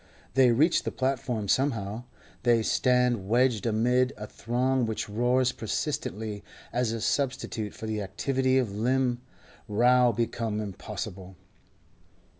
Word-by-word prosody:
They 130 -1 +5
reach 150 +9 +3
the - - -3
platform 125 -5 -2
somehow; 115 -3 0 0.4
they 120 -2 +3
stand 125 -5 +2
wedged 120 -1 +2
amid 125 +4 +2
a 105 - -6
throng 125 +3 0
which 110 - -3
roars 125 +4 +2
persistently 110 -4 -3 0.3
as 120 -2 0
a 115 - -3
substitute 125 -4 -2
for - - -7
the 110 -1 -2
activity 130 +7 0
of 125 -6 +1
limb 125 +2 +1 0.5
now 125 +3 +4
become 115 -1 -2
impossible. 100 -2 -6
120 Hz, 120 wpm, -27 LUFS, 110-130 Hz, 0.5 s, They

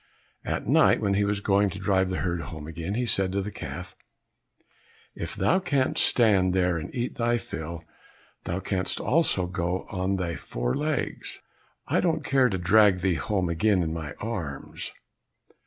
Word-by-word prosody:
At - - -3
night - - +5
when 100 -1 +1
he 100 +1 +2
was 100 0 -1
going 100 0 +3
to 95 - -7
drive 95 -1 +1
the 95 - -2
herd 85 -2 -1
home 80 -2 -7
again, 80 +5 -4
he 125 +1 0
said 95 -5 +1
to 100 - 0
the 105 - -5
calf, - - -7 1.2
"If - - -6
thou 185 - +2
canst 140 -8 +2
stand 95 -6 +4
there 90 -2 +2
and 75 - -6
eat 120 0 -3
thy 120 0 +2
fill, 85 -6 -6 0.6
thou 90 +3 -2
canst 95 -1 -1
also 125 - +2
go 90 0 -2
on 95 -1 -1
thy 90 -3 -2
four - - -3
legs; 150 -1 -3 0.4
I - - +2
don't 160 -4 0
care 130 -2 +3
to 95 - -1
drag 95 +1 +4
thee 95 0 +2
home 95 +2 -1
again 90 +3 +2
in 80 -1 -2
my 80 -3 -5
arms." 90 -11 -5
95 Hz, 170 wpm, -26 LUFS, 85-110 Hz, 1.2 s, night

